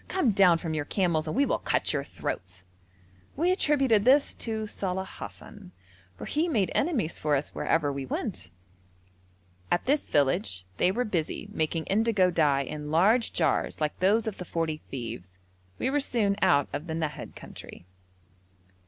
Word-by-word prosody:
Come 335 -12 +2
down 190 -4 +5
from 165 -1 -4
your 155 -2 -2
camels 170 -3 0
and 155 - -2
we 280 - +4
will - - 0
cut - - 0
your - - -1
throats.' 95 0 -6 0.7
We 345 +5 +2
attributed 270 - +3
this 275 +4 +4
to 220 -2 -3
Saleh 190 -2 -3
Hassan, 195 -4 -10 0.4
for - - -7
he 315 +3 0
made 215 - +1
enemies 255 - 0
for 150 -1 +1
us 140 +1 -2
wherever 145 -3 +1
we 135 -1 -5
went. 90 -7 -4 1.2
At 175 - +1
this 290 +3 +1
village 135 - +1
they 180 - +3
were 245 +5 -1
busy 185 +1 -3
making 160 -2 -1
indigo 205 -3 +2
dye 145 -5 +2
in 150 +2 -6
large 205 +10 +3
jars 160 -4 0
like 150 -1 -2
those 205 +4 +3
of 220 -3 -4
the - - -4
forty 165 -2 -2
thieves. 105 -8 -7 0.4
We 260 - -1
were 290 - +2
soon 220 -7 +1
out 145 -1 +4
of 145 +4 -4
the 160 - -3
Nahad 160 -2 -4
country. - - -11
180 Hz, 165 wpm, -28 LUFS, 150-225 Hz, 1.2 s, down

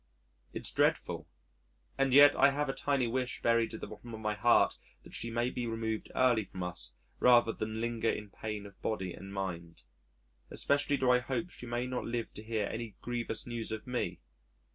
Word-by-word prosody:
It's - - -1
dreadful, - - +1 0.7
and 135 -1 +2
yet 145 +2 +8
I 140 - +6
have 145 +1 -1
a - - 0
tiny 140 -3 +1
wish 125 +2 -2
buried 115 -1 +2
at - - -8
the - - -3
bottom 120 -2 -9
of - - -8
my 105 -1 -1
heart 120 +3 +4 0.2
that - - -14
she 115 - -4
may 120 +2 0
be 120 -1 -3
removed 110 -1 -3
early 125 -4 +4
from 95 -1 -7
us 80 -9 -4 0.3
rather 120 -2 +6
than 110 0 -4
linger 115 -1 0
in 105 -1 -3
pain 105 -1 -5
of 100 -1 -14
body 95 -5 -2
and 95 0 -9
mind. 85 -4 -5 0.7
Especially 145 0 +2
do 130 -2 +3
I 125 - +5
hope 135 +8 -3
she 125 - -9
may 120 +1 -1
not 125 -1 -3
live 115 -1 -3
to - - -8
hear 110 -1 -1
any 110 0 -5
grievous 120 -2 -3
news 120 -2 -4
of 110 0 -4
me.... 125 -1 -2
115 Hz, 195 wpm, -32 LUFS, 105-125 Hz, 0.7 s, yet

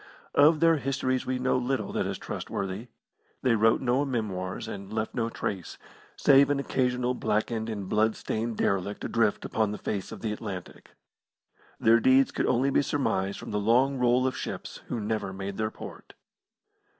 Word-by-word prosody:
Of 150 +2 +5
their 165 -1 +5
histories 130 -2 -1
we 130 0 0
know 130 0 +1
little 130 +2 -1
that - - -1
is - - -3
trustworthy. 100 +4 -4 0.6
They 125 - +4
wrote 110 0 +3
no 130 +2 +2
memoirs 105 -7 -3
and 100 -2 -7
left 110 0 -2
no 115 -1 -1
trace, 95 -5 -4 0.4
save 140 0 +5
an 145 -1 +1
occasional 125 -2 0
blackened 110 -1 -1
and 100 -3 -4
blood 110 +2 +2
stained 115 +1 -3
derelict 100 +1 -1
adrift 115 -3 +1
upon 110 -2 0
the 105 - -4
face 100 -3 -4
of - - -8
the 110 -2 -1
Atlantic. 100 -4 -8 0.8
Their 115 +1 +5
deeds 130 +3 +4
could - - -1
only 135 +3 +2
be - - +4
surmised 100 -9 -1
from - - -8
the 105 - 0
long 125 +6 +3
roll 125 +1 +3
of 130 - 0
ships - - -6
who 120 - -3
never 105 -2 -2
made 95 0 -5
their 110 0 0
port. - - -11
115 Hz, 175 wpm, -28 LUFS, 105-130 Hz, 0.8 s, Of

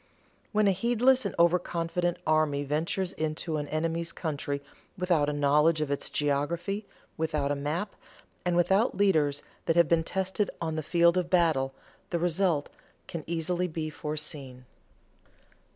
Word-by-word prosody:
When 215 -1 +3
a - - +5
heedless 245 +6 +3
and - - -7
over 170 +1 +5
confident 175 0 -2
army 155 -2 +2
ventures 160 +6 -1
into 155 +1 -2
an 145 -1 -3
enemy's 165 +2 -1
country 145 -3 -3 0.3
without 175 -5 +2
a - - 0
knowledge 150 +2 +3
of 150 -2 -1
its 140 - -1
geography, 170 +8 -1 0.3
without 155 -3 0
a - - +1
map, 155 +8 -3 0.5
and 180 -1 +1
without 190 +5 +3
leaders 155 -8 +2 0.2
that 165 - +3
have 170 -2 +5
been 165 0 +3
tested 190 +3 -1
on 160 -1 -2
the 155 - -1
field 170 +3 +3
of 175 -1 -3
battle, 155 -7 +2 0.3
the 170 - 0
result 170 -3 +1 0.3
can 165 -2 -6
easily 170 +2 -1
be 155 -2 -4
foreseen. 150 -4 -4
165 Hz, 150 wpm, -28 LUFS, 150-180 Hz, 0.5 s, a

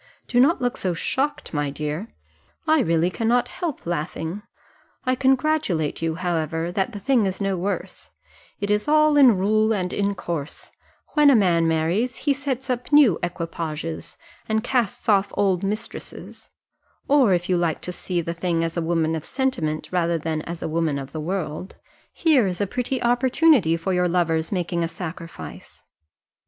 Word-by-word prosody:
Do 245 - +2
not 290 +7 +4
look 245 -1 -1
so 180 -2 -1
shocked, 275 - -2
my 145 -1 0
dear 150 +7 -4 0.6
I 315 0 +4
really 170 -4 +2
cannot 235 +4 +1
help 340 -6 -5
laughing. 170 +2 -3 0.6
I 255 - +2
congratulate 260 - +1
you, 165 -1 -1
however, 165 -1 -2
that 195 +5 -1
the 205 - -6
thing 235 -1 +2
is 190 - -3
no 195 -1 0
worse 190 +3 -4 0.5
it 205 0 -1
is 210 +4 +1
all 305 0 +4
in 260 -8 +7
rule 215 +3 +2
and 185 -4 -1
in 200 0 0
course 165 -5 -5 0.4
when 295 -2 +5
a 275 - +6
man 175 -6 +3
marries, 165 +10 0
he 285 - +1
sets 270 -2 -4
up 250 +1 -3
new 285 - +6
equipages, 165 -2 -5 0.3
and 220 0 +1
casts 245 -4 -1
off 200 -2 +3
old 190 -3 +2
mistresses; 210 +2 -6 0.6
or 265 -9 +5
if 175 0 -2
you 185 - +2
like 170 -2 0
to 180 - -5
see 180 -1 -2
the 170 0 -4
thing 170 -1 -1
as 165 0 -3
a 170 - 0
woman 165 -1 0
of 160 - -4
sentiment 255 - -2
rather 170 -2 +1
than 160 0 -2
as 170 -1 -5
a - - -1
woman 160 -2 0
of 135 0 -7
the 155 - -5
world, 175 0 -4 0.4
here 290 - +3
is 180 -1 -2
the 205 - 0
prettiest 250 +4 -2
opportunity 245 - +4
for 185 +3 -2
your 180 0 +2
lover's 165 -2 0
making 175 -3 -1
a - - 0
sacrifice. 170 0 -9
185 Hz, 170 wpm, -23 LUFS, 165-245 Hz, 0.6 s, in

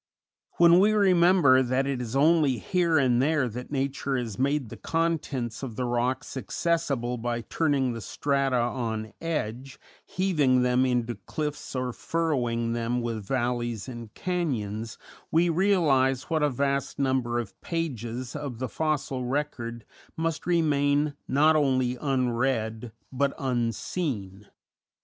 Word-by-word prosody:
When 170 +1 +6
we 210 +3 +4
remember 180 -8 +5
that 130 +1 +1
it 135 -2 -2
is 120 +1 -5
only 150 -2 +4
here 170 - +1
and 125 -3 +3
there 145 -2 +2
that 125 +2 -7
nature 140 -1 -1
has 115 -5 -4
made 140 -2 0
the - - -8
contents 155 -8 -2
of 125 -5 -6
the 125 - -2
rocks 125 +4 -1
accessible 130 -4 -1
by 120 0 -2
turning 140 -2 0
the 115 - -6
strata 140 +1 0
on 115 -3 -2
edge, 135 -5 -3 0.3
heaving 150 -9 +2
them 125 +1 +3
into 120 -1 0
cliffs 150 -2 -4
or 125 -1 -2
furrowing 120 -9 -1
them 120 +1 -1
with 115 -3 -3
valleys 120 -2 -2
and 120 -4 -8
canyons, 115 - -2 0.3
we 170 +2 +3
realize 155 -8 +2
what 160 -1 +2
a 150 - +3
vast 140 +1 -1
number 130 -3 0
of 115 -5 -5
pages 125 - -4
of 140 -5 -5
the 130 +2 -3
fossil 145 -4 -1
record 125 -4 -3 0.3
must 165 0 -2
remain 145 -3 +2
not 155 +3 +4
only 130 -4 +2
unread, 120 -4 -1 0.2
but 140 +1 0
unseen. 115 - -2
130 Hz, 135 wpm, -27 LUFS, 120-150 Hz, 0.3 s, When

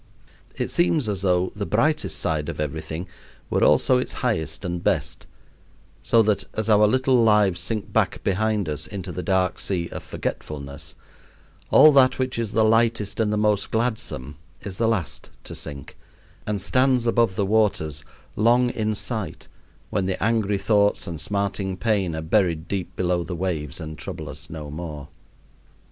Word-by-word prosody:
It - - -2
seems 165 -7 +2
as 100 -3 -2
though 90 -1 +1
the 105 - -3
brightest 150 +8 +1
side 75 -2 -1
of - - -6
everything 80 +3 -4 0.4
were - - +2
also 65 - +4
its - - -4
highest 80 +4 -1
and 90 -1 -3
best, - - -1 0.7
so 115 -1 +4
that 105 -2 +1
as 110 0 -1
our 105 0 +6
little 130 +1 +3
lives 105 -5 +4
sink 100 +4 -4
back - - +1
behind 105 0 0
us 75 0 -3
into 100 -3 -6
the 90 - -4
dark 95 -2 0
sea 85 -3 -2
of - - -6
forgetfulness, 70 0 -6 0.7
all 155 - +8
that 135 -2 +5
which 130 -2 -2
is 110 -3 -3
the 110 - +3
lightest 110 -2 +2
and 110 -2 +2
the 105 - 0
most 105 -1 +1
gladsome 110 - -2 0.2
is 95 -1 -7
the 115 - +2
last 110 -7 -2
to - - -9
sink, 70 -2 -8 0.5
and 105 -1 -1
stands 130 +2 +2
above 115 -4 +2
the 100 - 0
waters, 95 -8 +1 0.3
long 120 +3 +3
in 110 -2 -1
sight, 100 -8 -4 0.4
when 95 -2 0
the 95 - -2
angry 110 -3 +1
thoughts 100 +1 +2
and 80 -3 -5
smarting 100 -2 -2
pain 100 -6 0
are 80 - -4
buried 85 -2 +1
deep 95 -2 -4
below 90 -1 0
the 90 0 -5
waves 80 -5 -3
and 80 -3 -7
trouble - - -6
us - - -10
no 75 -2 -7
more. 75 -3 -7
100 Hz, 165 wpm, -24 LUFS, 85-110 Hz, 0.7 s, all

